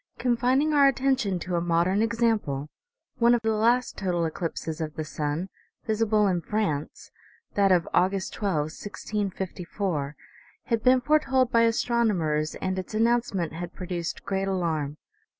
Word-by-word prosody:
Con 245 -2 +1
fining 265 +5 +2
our 285 -1 +6
attention 265 -8 +1
to 175 +1 -3
a - - 0
modern 175 +4 +2
example, 225 - 0 0.5
one 235 0 +5
of 235 - -1
the 220 - +2
last 235 +4 +1
total 175 -4 0
eclipses 160 0 -4
of 155 -1 -4
the 155 - -4
sun, 155 +3 -3 0.4
visible 215 -1 +2
in 180 -3 +1
France, 165 -8 -3 0.4
that 200 -1 +3
of 175 -2 +3
August 190 +1 +1
12, 155 -7 -1
1654, 190 -6 -3 0.5
had 230 -1 0
been 255 +1 +4
foretold 265 -3 +2
by 230 - +4
astronomers, 215 -10 +1
and 190 0 -2
its 185 +3 -6
an 220 - +3
nouncement 230 -8 +1
had 175 +1 -6
produced 175 -2 -4
great 195 0 -1
alarm. 160 -6 -1
195 Hz, 150 wpm, -26 LUFS, 170-230 Hz, 0.5 s, our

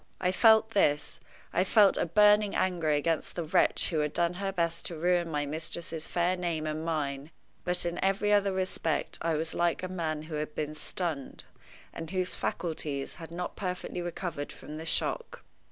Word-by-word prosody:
I 180 -1 +2
felt 220 +2 +5
this; 150 -8 +1 0.3
I 180 - +3
felt 200 +1 +5
a - - 0
burning 210 +3 +5
anger 175 -4 +1
against 150 +2 0
the 175 - -2
wretch 160 - +2
who 160 - +1
had 150 -1 0
done 170 0 +1
her 195 -1 0
best 170 -3 -1
to 170 - -5
ruin 175 +1 +1
my 145 -2 -1
mistress's 160 +1 -5
fair 175 +1 +1
name 170 -3 -2
and 155 +1 -2
mine, 145 -3 -2 0.3
but 180 0 0
in 175 0 -2
every 200 +2 +2
other 200 -1 +4
respect 185 -4 -2
I 165 -1 +1
was 160 +1 -2
like 170 +1 +1
a - - -1
man 160 -4 -3
who 155 0 -9
had 150 0 -4
been 155 0 -2
stunned, 155 -2 -3 0.5
and 165 -1 -6
whose 185 -1 -1
faculties 150 -5 -3
had 165 - -7
not 175 +2 -5
perfectly 180 -2 -4
recovered 175 -4 -4
from 150 +1 -9
the 160 +1 -6
shock. 475 - 0
170 Hz, 185 wpm, -30 LUFS, 155-185 Hz, 0.5 s, felt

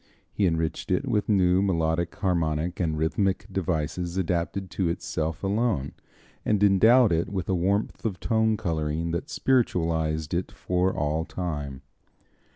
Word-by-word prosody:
He 100 - +2
enriched 80 -1 -2
it - - 0
with 105 0 0
new 95 -2 +4
melodic, 85 -3 0
harmonic 85 -3 -1
and 80 -4 0
rhythmic 90 +5 0
devices 85 0 -2
adapted 90 +1 -1
to 95 -3 0
itself 80 -1 -3
alone, 100 - 0 0.5
and 105 -1 +1
endowed 110 +4 +6
it 85 +3 +1
with 95 -3 -3
a 95 - +1
warmth 95 +4 0
of 100 -6 -2
tone 110 -1 +1
coloring 80 -1 -2
that 85 - -3
spiritualized 80 - 0
it 90 +1 -1
for 90 +1 0
all 75 +1 -1
time. 75 -7 -5
90 Hz, 140 wpm, -26 LUFS, 80-95 Hz, 0.5 s, endowed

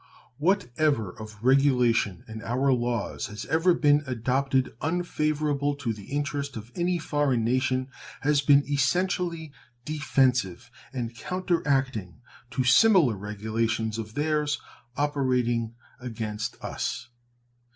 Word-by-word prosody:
What 175 -5 +1
ever 140 -11 +1
of 110 +2 -10
regulation 125 -7 +3
in 110 0 -7
our 130 +4 +1
laws 120 -3 -2
has 105 +1 -7
ever 170 +2 +3
been 145 -2 +4
adopted 130 +2 0
unfavorable 150 -3 0
to 135 -5 -2
the 105 -2 -11
interest 145 -2 -3
of 110 +2 -9
any 175 0 +1
foreign 145 -7 0
nation 130 +1 +1 0.3
has 145 0 +3
been 140 0 +4
essentially 165 +2 0 0.3
defensive 125 - +1 0.2
and 120 -3 -4
counteracting 135 - -1 0.3
to 130 +1 -1
similar 150 - +5
regulations 110 +2 -2
of 110 0 -7
theirs 150 0 0 0.4
operating 125 -5 0 0.2
against 110 -3 -4
us. - - -4
130 Hz, 110 wpm, -27 LUFS, 115-150 Hz, 0.4 s, similar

